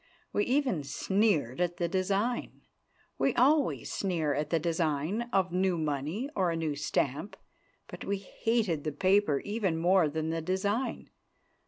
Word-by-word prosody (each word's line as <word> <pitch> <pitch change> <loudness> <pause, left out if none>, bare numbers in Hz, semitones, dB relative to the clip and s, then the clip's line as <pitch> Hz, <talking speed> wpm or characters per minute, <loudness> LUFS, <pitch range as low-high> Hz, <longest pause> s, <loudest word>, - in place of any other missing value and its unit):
We 205 - +2
even 255 - +1
sneered 180 - +1
at 175 0 0
the 175 - 0
design. 195 +7 -1 0.6
We 270 - +2
always 285 +3 +2
sneer 165 -7 0
at 150 +1 -2
the 165 - +2
design 165 +6 -1
of 185 -2 +2
new 185 0 +1
money 155 - -2
or 185 -2 +2
a 165 - -1
new 160 -3 -1
stamp. 145 +4 -2 0.5
But - - -9
we 200 0 0
hated 200 -4 -1
the 155 - -2
paper 185 -3 +2
even 205 -5 -1
more 175 -1 +4
than 160 +1 -2
the 165 0 -2
design. 200 +8 -2
180 Hz, 150 wpm, -30 LUFS, 155-205 Hz, 0.6 s, more